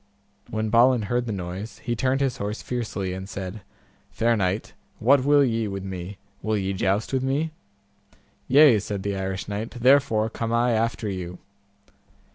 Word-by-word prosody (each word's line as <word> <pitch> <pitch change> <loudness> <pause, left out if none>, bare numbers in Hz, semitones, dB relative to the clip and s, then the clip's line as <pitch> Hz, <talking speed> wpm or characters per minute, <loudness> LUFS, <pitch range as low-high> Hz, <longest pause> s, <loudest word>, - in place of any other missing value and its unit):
When 110 -1 -2
Balin 120 0 +5
heard 120 +4 -1
the - - -2
noise, 95 +2 -5
he 120 -1 -3
turned 130 +3 +1
his 135 -3 0
horse 105 +2 -4
fiercely, 105 -6 -3
and 95 +1 -7
said, 95 +2 -6 0.5
Fair 115 - +1
knight, 100 0 -1 0.2
what 130 +3 +4
will 145 0 +5
ye 115 -3 0
with 100 -1 -5
me, 95 0 -6 0.2
will 110 -1 0
ye 95 -1 -1
joust 95 +5 0
with 130 - +1
me? 140 +5 0 1.0
Yea, 135 -4 +7
said 100 -1 -4
the 100 0 -2
Irish 95 -1 -3
knight, 105 +3 -3
therefore 120 -3 +3
come 115 0 -4
I 120 +1 +2
after 115 0 0
you. 90 -2 -5
110 Hz, 165 wpm, -25 LUFS, 95-120 Hz, 1.0 s, Yea